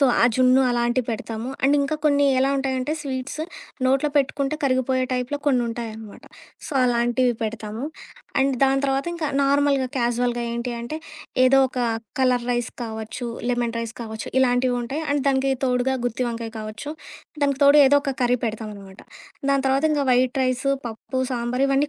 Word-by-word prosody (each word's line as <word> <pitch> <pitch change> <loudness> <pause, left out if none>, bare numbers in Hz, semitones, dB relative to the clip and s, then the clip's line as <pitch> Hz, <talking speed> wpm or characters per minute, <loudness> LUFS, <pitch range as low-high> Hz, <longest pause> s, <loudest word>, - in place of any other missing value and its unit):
So, 275 - +6 0.2
ఆ - - +7
జున్ను 255 0 +5
అలాంటివి 240 +1 +1
పెడతాము. 225 +1 -4
అండ్ 280 +2 +4
ఇంకా 280 +2 0
కొన్ని 285 -1 +4
ఎలా 265 +1 +3
ఉంటాయంటే, 265 +1 -1
స్వీట్స్ 270 +1 -4 0.4
నోట్లో 270 +3 +3
పెట్టుకుంటే 275 +1 +1
కరిగిపోయే 260 -1 +1
టైప్‌లో 250 +3 -2
కొన్నుంటాయన్నమాట. 230 -4 -2 0.4
సో, - - -8
అలాంటివి 245 0 +2
పెడతాము. 215 0 -4 0.6
అండ్ 270 0 +3
దాని 270 0 +4
తర్వాత 270 +3 0
ఇంకా 330 -2 -2 0.2
నార్మల్‌గా, 275 -1 +2
క్యాజువల్‌గా 240 0 0
ఏంటి 235 +1 -3
అంటే, 235 +7 -5 0.5
ఏదో 270 +1 +5
ఒక 255 - -6 0.4
కలర్ 250 -2 +2
రైస్ 240 -1 -1
కావచ్చు, 220 +2 -5 0.2
లెమన్ 240 -1 -1
రైస్ 230 0 -4
కావచ్చు 220 -1 -6
ఇలాంటివి 245 0 +2
ఉంటాయి. 275 +7 -4
అండ్ 285 -1 +1
దానికి 270 0 +2
తోడుగా 255 +1 +1
గుత్తి 245 +2 -2
వంకాయ 230 -1 -5
కావచ్చు, 215 +7 -6 0.5
దానికి 280 -1 +1
తోడు 285 +1 +7
ఏదో 285 +2 +5
ఒక 275 -2 -1
కర్రీ 245 0 +2
పెడతామనమాట. 210 -3 -7 0.5
దాని 275 -1 +2
తర్వాత 270 +3 +2
ఇంగ 290 -2 +1
వైట్ 255 +1 +2
రైస్, 255 +2 0 0.2
పప్పు, 235 +3 -4
సాంబార్ 245 +2 0
ఇవన్నీ 275 +2 +2
255 Hz, 155 wpm, -23 LUFS, 235-275 Hz, 0.6 s, ఆ